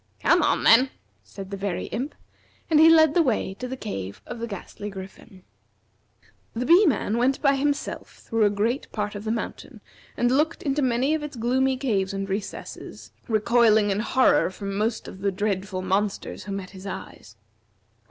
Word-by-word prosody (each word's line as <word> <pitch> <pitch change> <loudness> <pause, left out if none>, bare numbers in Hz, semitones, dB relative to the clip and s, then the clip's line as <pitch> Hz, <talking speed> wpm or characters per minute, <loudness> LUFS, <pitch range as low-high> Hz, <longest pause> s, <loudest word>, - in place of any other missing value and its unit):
"Come - - +4
on, - - +1
then," 255 +4 +6 0.3
said 195 -1 -10
the 200 - -4
Very 195 -2 -3
Imp, 260 +7 -4 0.6
and 305 - +5
he 320 +1 +8
led 315 -2 +6
the 345 - +4
way 235 -9 0
to 250 - -4
the 260 +1 -5
cave 100 - -6
of - - -7
the 235 - -4
Ghastly 205 0 -7
Griffin. 190 0 -11 1.1
The 240 +2 -2
Bee 355 +8 +6
man 230 -4 0
went 265 +2 +2
by 280 -2 +3
himself 285 +1 -2
through 225 -2 0
a - - +4
great 220 +6 -1
part 210 -1 -3
of 205 +1 -7
the 220 - -1
mountain, 230 - -5 0.4
and 240 0 +2
looked 305 +5 +1
into 290 0 0
many 260 +3 +1
of 315 - -1
its 295 -2 -6
gloomy 260 +3 +1
caves 200 -8 -1
and 195 0 -3
recesses, 195 +1 -6 0.2
recoiling 220 -1 +3
in 195 - 0
horror 265 +5 +3
from 195 +1 -6
most 215 +3 -1
of 190 - -10
the 200 0 0
dreadful 190 -1 -2
monsters 195 0 -2
who 205 - -6
met 195 -1 -5
his 190 0 -10
eyes. 105 - -9
220 Hz, 180 wpm, -25 LUFS, 195-265 Hz, 1.1 s, he